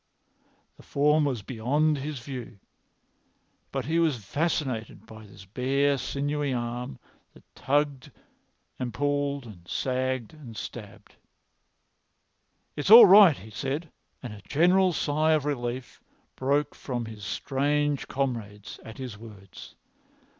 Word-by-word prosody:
The - - -15
form 150 +2 +2
was 125 -7 -2
beyond 140 +7 0
his 145 +1 -5
view, 125 -3 -8 1.1
but 135 -3 -3
he 160 +4 +1
was 145 -11 0
fascinated 130 - -2
by 110 -1 -12
this 95 -1 -14
bare 135 +6 +1
sinewy 145 +2 -2
arm 120 - -4 0.4
which - - -18
tugged 145 0 -1 0.7
and 125 -2 -4
pulled 145 -1 -1
and 90 -6 -13
sagged 130 - -2
and 130 -8 -11
stabbed. 105 -2 -9 1.6
"It's 145 +4 -3
all 230 +3 +12
right," 195 -5 +8
he 110 - -12
said, 140 - -4 0.3
and 120 -4 -6
a 105 - -11
general 180 - +3
sigh 155 0 +1
of 150 -2 +1
relief 125 -3 -4 0.3
broke 140 +3 0
from 120 -3 -4
his 110 -2 -10
strange 145 +5 -1
comrades 115 -7 -4
at 110 - -10
his 125 -6 -7
words. 105 -4 -13
135 Hz, 125 wpm, -27 LUFS, 115-145 Hz, 1.6 s, all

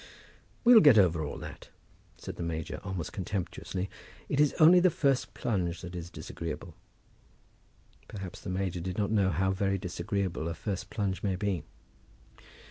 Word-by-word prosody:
"We'll 240 -2 +9
get 145 - +7
over 85 -5 +4
all 75 - -4
that," - - -9 0.5
said - - -7
the - - -7
major, 80 -2 -3
almost 95 -4 -4
contemptuously. 95 0 -3 0.4
"It 140 - 0
is 150 -1 +4
only 170 +3 +8
the 185 +1 +5
first 140 -5 0
plunge 90 -7 -1
that 90 0 -8
is 85 -1 -6
disagreeable." 85 -3 -6 1.3
Perhaps 95 -4 -7
the - - -6
major 95 -1 -2
did 90 +2 -4
not 105 -1 0
know 100 -3 +3
how 95 +3 +1
very 95 +1 0
disagreeable 90 -1 -2
a 85 - -3
first 95 +2 -4
plunge 100 -4 -2
may 95 -2 0
be! 95 -2 -1
95 Hz, 155 wpm, -30 LUFS, 85-105 Hz, 1.3 s, We'll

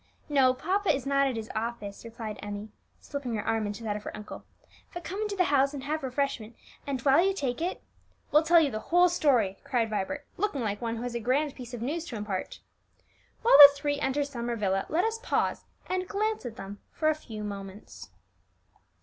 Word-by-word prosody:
"No; 270 -3 +5
papa 385 +8 0
is 275 -3 -2
not 275 0 +3
at 260 - -2
his 225 -1 -5
office," 220 -3 -4
replied 225 -2 -7
Emmie, 205 +1 -6 0.3
slipping 275 -5 -4
her 210 - -3
arm 225 -2 0
into 205 +3 -6
that 210 -2 -2
of 210 - -5
her - - -7
uncle. 210 0 -9 0.5
"But 350 - -5
come 390 +5 -4
into 420 -2 -2
the 370 - +3
house 275 +1 +3
and 270 - -6
have 305 +3 -2
refreshment, 260 -4 -2 0.3
and 275 -2 -1
while 280 +5 +5
you 390 0 +1
take 260 -6 -2
it 355 +2 -3 0.2
" - - -38
"We'll 300 - +6
tell 335 +2 +6
you 295 -4 +2
the 215 - -3
whole 355 +8 +4
story," 245 - +2
cried 235 -4 0
Vibert, 210 +7 -3
looking 365 -9 -1
like 205 -2 -2
one 230 -1 -2
who 230 - -5
has 245 -1 -4
a 235 - -2
grand 270 +5 +1
piece 245 -1 -8
of 235 - -6
news 315 +6 -2
to 260 - -7
impart. 205 -3 -4 0.8
While 455 -11 +7
the 285 -1 +14
three 285 0 -1
enter 285 0 0
Summer 240 -4 -4
Villa, 195 -3 0
let 345 +6 +2
us 450 0 -1
pause - - -1 0.2
and 370 0 -2
glance 425 - -1
at 230 - -8
them 200 0 -8
for 310 - -1
a - - +4
few 225 -8 -8
moments. 200 0 -8
260 Hz, 215 wpm, -28 LUFS, 220-305 Hz, 0.8 s, the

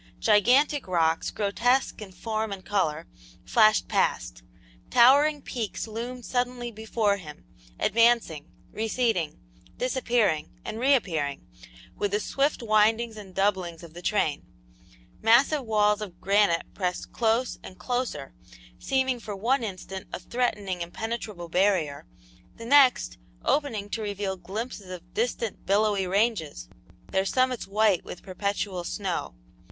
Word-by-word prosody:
Gigantic 250 +7 +3
rocks, 165 -3 +1
grotesque 230 +5 0
in 200 -3 -8
form 220 +3 -3
and 195 -1 -7
color, 165 -6 0 0.4
flashed 215 -1 +4
past; - - 0 0.5
towering 280 +4 +5
peaks 225 -2 -4
loomed 240 +3 -6
suddenly 245 -1 -2
before 215 -1 0
him, 150 -6 -11 0.3
advancing, 230 - +2 0.2
receding, 220 -7 -1 0.4
disappearing, 240 - +1 0.2
and 220 - -5
reappearing 180 - +1 0.5
with 205 - -1
the 205 +1 0
swift 275 +3 0
windings 220 +1 +2
and 200 -3 -11
doublings 185 -4 0
of 165 -2 -12
the 175 - -9
train; 175 -7 0 0.8
massive 260 +6 +4
walls 210 -2 +2
of 195 -5 -7
granite 200 -4 +3
pressed 180 -2 -3
close 230 +2 0
and 185 - -11
closer, 245 - -3 0.5
seeming 260 -2 0
for 210 -3 -6
one 240 +6 +1
instant 190 -2 -6
a - - -4
threatening, 200 -3 -2
impenetrable 210 0 -5
barrier, 175 -5 +1 0.5
the 230 - -9
next, 260 - +4 0.3
opening 235 -9 0
to 220 +2 -4
reveal 200 -2 -3
glimpses 200 +1 -6
of 180 -1 -10
distant 230 -2 -2
billowy 200 -1 +2
ranges, 190 - 0 0.4
their 190 - +2
summits 255 +4 0
white 205 -2 +2
with - - -9
perpetual 195 -1 -3
snow. 180 - -3
210 Hz, 125 wpm, -26 LUFS, 185-235 Hz, 0.8 s, towering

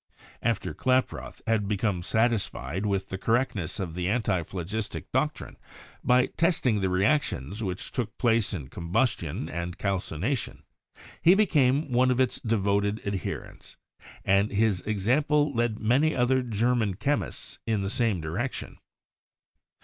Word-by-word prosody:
After 115 -2 -1
Klaproth 130 0 -1
had 110 -3 +1
become 100 -3 0
satisfied 105 - 0
with 100 -1 -1
the 95 - -4
correctness 115 -7 0
of 90 -4 -3
the 90 +1 -2
antiphlogistic 100 -1 -2
doctrine, - - -1 0.5
by 125 +1 +4
testing 155 - +1
the 95 -1 0
reactions 100 - 0
which 95 -3 -4
took 115 -5 -3
place 115 -3 +2
in 75 -9 -5
combustion 85 - -1
and 85 +1 -4
calcination, 100 - -2 0.6
he 175 +3 +7
became 150 -8 +3
one 125 +1 +4
of 125 0 +1
its 130 -2 +1
devoted 100 -1 +1
adherents; 100 -2 -5 0.5
and 100 +2 +3
his 105 -3 +2
example 140 +8 +2
led 120 -2 0
many 130 +8 +2
other 130 +1 +3
German 115 -3 +1
chemists 100 -6 -2
in 110 -3 +1
the 95 - -1
same 115 -6 +1
direction. 100 +12 -4
110 Hz, 125 wpm, -27 LUFS, 95-125 Hz, 0.6 s, he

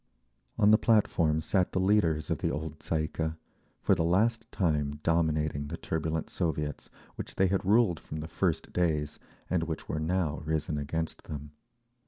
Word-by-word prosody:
On 105 -1 +5
the 110 - +6
platform 85 -8 +3
sat 90 +3 +1
the - - +1
leaders 95 -6 +2
of - - 0
the - - 0
old 80 0 -4
Tsay 80 0 -1
ee - - -1
kah—for 80 +4 -3
the 80 -3 +1
last 110 +7 +1
time 75 -5 0
dominating 75 -3 +1
the 80 +3 -5
turbulent 80 0 -2
Soviets, 75 -4 -2 0.3
which - - -6
they 95 - +3
had 95 +1 +1
ruled 100 -5 +3
from 70 +5 -7
the 80 - -5
first 85 -1 -1
days, 75 -4 0 0.3
and 90 -2 +1
which 80 -1 -5
were 80 - -2
now 80 -2 0
risen 80 -1 -1
against 80 +3 -3
them. 75 -1 -7
80 Hz, 170 wpm, -30 LUFS, 75-90 Hz, 0.3 s, the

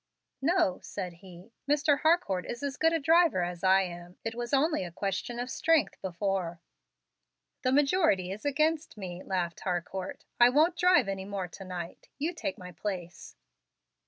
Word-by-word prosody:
"No," 330 0 +2
said 185 -3 -5
he; 185 +3 -13 0.2
"Mr. 290 0 +3
Harcourt 315 - +2
is 240 +4 -5
as 280 -1 -2
good 325 +2 +3
a 330 - +2
driver 325 - +4
as 175 0 -5
I 190 +1 +6
am. 175 0 -8
It 225 - -3
was 240 0 -5
only 300 - +2
a 175 - -6
question 195 +6 -3
of 245 +1 -3
strength 325 -2 +2
before." 185 -2 -2 1.0
"The 255 - +1
majority 280 - +3
is 200 +2 -7
against 305 0 0
me," 180 -3 -6
laughed 175 -3 -2
Harcourt. 180 +1 -4
"I 240 0 +8
won't 310 +7 +4
drive 355 - +4
any 195 -1 -3
more 195 -2 -3
to 195 - -10
night. 175 -2 -7
You 315 +5 -1
take 295 -5 -4
my 180 -2 -9
place." 175 -1 -6
210 Hz, 165 wpm, -29 LUFS, 180-295 Hz, 1.0 s, I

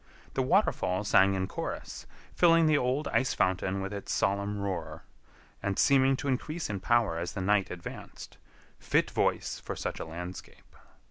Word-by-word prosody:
The 135 - 0
waterfall 130 - +1
sang 95 -1 +4
in 95 0 -1
chorus, - - -6 0.3
filling 165 -1 +5
the 155 -1 +4
old 135 +2 0
ice 130 - +1
fountain 95 +1 0
with 95 +1 -4
its 100 - -5
solemn 100 +1 0
roar, 95 -5 -4 0.6
and 100 0 -2
seeming 135 -1 +4
to 145 - -4
increase 150 +3 -2
in 100 - -3
power 115 -7 +2
as 85 - -4
the 100 - -5
night 100 0 +2
advanced—fit 90 -1 -5
voice - - 0
for - - -6
such - - -4
a - - -4
landscape. 90 +3 -9
100 Hz, 155 wpm, -29 LUFS, 95-135 Hz, 0.6 s, filling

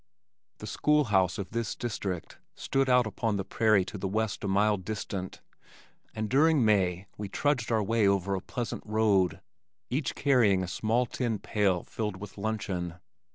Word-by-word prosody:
The - - -8
school 150 0 +2
house 95 -1 +3
of 100 -4 -5
this 115 -2 -2
district 100 -7 -4 0.2
stood 135 -1 0
out 125 -1 +5
upon 110 0 -1
the 95 - -3
prairie 110 -4 +3
to 105 +1 -7
the 95 - -2
west 110 +2 -2
a - - -1
mile 105 +2 +3
distant, 95 -1 -5 0.7
and 110 0 -2
during 145 +1 +4
May 95 -3 +2
we 105 -2 -4
trudged 125 -1 0
our 110 -2 +2
way 110 0 +2
over 100 0 +1
a 95 - -2
pleasant 120 +4 -4
road, 105 -4 +2 0.5
each 135 +2 -1
carrying 115 -9 +3
a - - -4
small 115 +7 0
tin 120 -2 -2
pail 100 -4 0
filled 105 -4 -4
with 100 +1 -10
luncheon. 95 -5 -3
105 Hz, 165 wpm, -29 LUFS, 95-115 Hz, 0.7 s, out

